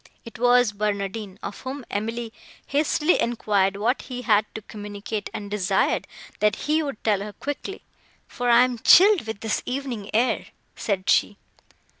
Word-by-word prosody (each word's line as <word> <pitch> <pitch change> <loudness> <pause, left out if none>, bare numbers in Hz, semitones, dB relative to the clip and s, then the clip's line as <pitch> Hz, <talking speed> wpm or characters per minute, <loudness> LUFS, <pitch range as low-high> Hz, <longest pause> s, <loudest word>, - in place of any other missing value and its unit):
It 230 - -10
was 245 -2 +4
Barnardine, 200 -1 -3
of 200 - -6
whom 260 0 -6
Emily 225 +2 -3 0.3
hastily 300 +3 +2
enquired 200 -4 +1
what 235 +6 0
he 250 -1 -7
had 210 -3 +3
to 220 - -6
communicate, 205 0 -6
and 205 -1 -7
desired, 200 -3 +1 0.3
that 210 0 +3
he 310 +2 +2
would 280 -7 -5
tell 210 -3 +2
her 210 0 -6
quickly, 290 - -6 0.4
"for 245 0 -2
I 240 +1 +7
am 250 -2 -1
chilled 380 - +6
with 220 -2 -5
this 220 -1 -1
evening 250 -6 -4
air," 235 +4 +1 0.3
said 195 -3 -2
she. 205 - +3
225 Hz, 155 wpm, -24 LUFS, 205-250 Hz, 0.4 s, I